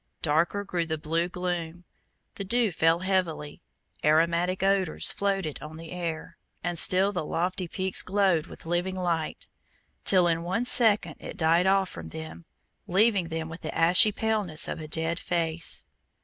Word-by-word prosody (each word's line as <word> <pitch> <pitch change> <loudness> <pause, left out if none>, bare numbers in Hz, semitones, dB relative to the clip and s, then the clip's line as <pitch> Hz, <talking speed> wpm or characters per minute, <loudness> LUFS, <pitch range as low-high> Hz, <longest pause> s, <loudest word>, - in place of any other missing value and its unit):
Darker 165 +6 +1
grew 175 -4 -3
the 160 -1 -2
blue 165 +3 -1
gloom, 175 -1 -5 0.5
the 200 - -6
dew 230 +2 +1
fell 165 +1 +2
heavily, 180 -6 -2 0.4
aromatic 170 +4 +2
odors 195 -4 +1
floated 195 -6 -2
on 155 +1 -9
the 165 0 -10
air, 170 -3 -6 0.2
and 175 -2 -2
still 190 +4 +2
the 180 -5 -3
lofty 180 +3 -2
peaks 185 +2 0
glowed 185 -4 +1
with - - -13
living 175 +3 -2
light, 170 -4 -3 0.6
till 185 -2 +5
in 165 -1 0
one 185 +8 -2
second 210 -10 +5
it - - -9
died 165 +3 +2
off 195 0 +3
from - - -9
them, 160 +1 -9 0.4
leaving 195 -1 +2
them 160 -1 -4
with 165 +1 -10
the 155 - -6
ashy 175 +6 +6
paleness 210 -7 0
of - - -5
a 155 - -7
dead 160 +2 -1
face. 165 -1 0
175 Hz, 160 wpm, -26 LUFS, 165-190 Hz, 0.6 s, ashy